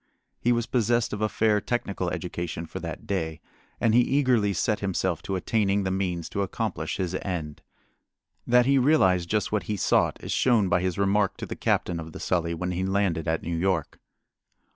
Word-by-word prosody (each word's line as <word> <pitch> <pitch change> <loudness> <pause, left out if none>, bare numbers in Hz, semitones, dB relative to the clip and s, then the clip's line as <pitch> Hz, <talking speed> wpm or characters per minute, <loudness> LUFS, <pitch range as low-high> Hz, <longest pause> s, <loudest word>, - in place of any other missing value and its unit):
He 120 - +2
was 120 -1 +1
possessed 120 -1 +1
of 105 - -4
a 110 - +1
fair 105 -1 +2
technical 100 -7 -2
education 85 -1 -4
for - - -7
that - - -6
day, 80 -5 -2 0.4
and 115 -2 +2
he 120 - +6
eagerly 125 -6 +2
set 105 +2 0
himself 95 -3 -1
to 95 - -3
attaining 100 +1 +1
the 95 - -1
means 90 -3 -2
to 100 - -2
accomplish 95 - -3
his 90 -2 -2
end. 80 -6 -4 0.9
That 125 0 +5
he 135 +1 +4
realized 95 - +3
just 105 -2 0
what 105 -1 0
he 105 - 0
sought - - +2
is - - -4
shown 115 -7 +3
by 90 0 +2
his 90 -2 -1
remark 100 0 +1
to - - -5
the - - -6
captain 85 -2 0
of 80 -1 -8
the - - -8
Sully 85 -2 0
when 90 +2 -3
he 90 +1 -2
landed 95 -4 0
at 80 0 0
New 85 0 -2
York. 85 -3 -1
95 Hz, 195 wpm, -26 LUFS, 85-110 Hz, 0.9 s, he